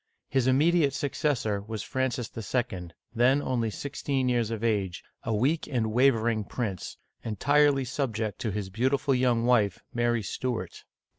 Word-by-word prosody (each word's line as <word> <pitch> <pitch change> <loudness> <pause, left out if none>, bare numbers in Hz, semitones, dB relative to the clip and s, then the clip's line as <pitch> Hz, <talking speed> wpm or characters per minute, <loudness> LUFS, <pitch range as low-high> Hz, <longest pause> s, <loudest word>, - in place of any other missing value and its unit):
His 130 -2 +1
im 130 0 +4
mediate 155 -2 +3
successor 135 -8 -1
was 110 0 -5
Francis 130 -3 -2
II., 110 -5 -2 0.3
then 125 +4 +4
only 125 -5 -1
sixteen 135 +1 -2
years 120 -3 +1
of 115 -1 -4
age, 100 -6 0 0.2
a 115 - -3
weak 135 +9 +1
and 115 -6 -1
wavering 115 -3 +3
prince, 100 -4 -4 0.3
entirely 140 +4 +3
subject 115 -5 -2
to 115 - -2
his 100 -1 -4
beautiful 130 +6 +1
young 125 -2 +2
wife, 110 -6 +2
Mary 120 -1 +1
Stuart. 110 -2 -4
120 Hz, 145 wpm, -28 LUFS, 110-135 Hz, 0.3 s, im